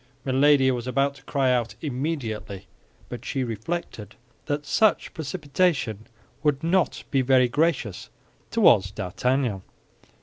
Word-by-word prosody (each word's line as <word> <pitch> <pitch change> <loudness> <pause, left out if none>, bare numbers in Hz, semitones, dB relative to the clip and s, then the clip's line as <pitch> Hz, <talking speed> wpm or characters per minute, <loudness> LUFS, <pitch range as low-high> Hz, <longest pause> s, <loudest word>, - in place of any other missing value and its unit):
Milady 135 0 +4
was 125 -1 -3
about 135 +2 +1
to 135 -1 -18
cry 135 -3 +1
out, 120 -2 0
"Immediately," 125 - -4 0.4
but 120 -1 -8
she 135 -1 -2
reflected 115 - -5 0.3
that 145 0 -2
such 215 +7 +2
precipitation 145 - -1 0.3
would 150 -1 +1
not 175 +1 +1
be 135 - +3
very 130 -1 +4
gracious 140 - -1 0.4
toward 95 0 +4
D'Artagnan. 120 +2 -1
135 Hz, 115 wpm, -25 LUFS, 120-150 Hz, 0.4 s, Milady